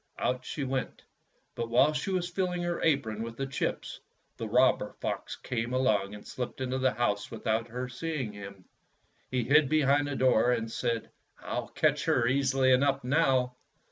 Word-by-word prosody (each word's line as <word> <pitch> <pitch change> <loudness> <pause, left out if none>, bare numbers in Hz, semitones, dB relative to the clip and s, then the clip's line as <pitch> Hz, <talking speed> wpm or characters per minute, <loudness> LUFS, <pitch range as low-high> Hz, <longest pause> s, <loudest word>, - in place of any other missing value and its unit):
Out 125 0 -1
she 140 +3 -4
went, 130 -1 -3 0.5
but 115 -1 -4
while 135 +6 +4
she 150 +6 -2
was 180 -2 -1
filHng 180 -1 -1
her 175 0 -2
apron 120 -9 +1
with 115 0 -6
the 135 - -2
chips 135 -1 -3 0.4
the - - -4
robber - - +3
fox - - -3
came 120 +1 -3
along 105 -6 +1
and 105 - -12
slipped 125 0 -5
into 130 0 -2
the 130 -4 +1
house 105 -3 0
without 115 0 -1
her 125 +2 -4
seeing 130 -3 -4
him. 100 -2 -10 0.6
He 130 -1 0
hid 145 +2 +4
behind 145 -1 +3
the 145 - -3
door, 125 -2 +4
and 115 -1 -2
said, 115 -1 -2 0.3
"I'll - - -4
catch - - +1
her - - +2
easily 135 +1 +2
enough, 135 +1 +3
now." 130 -3 +2
130 Hz, 170 wpm, -29 LUFS, 115-140 Hz, 0.6 s, while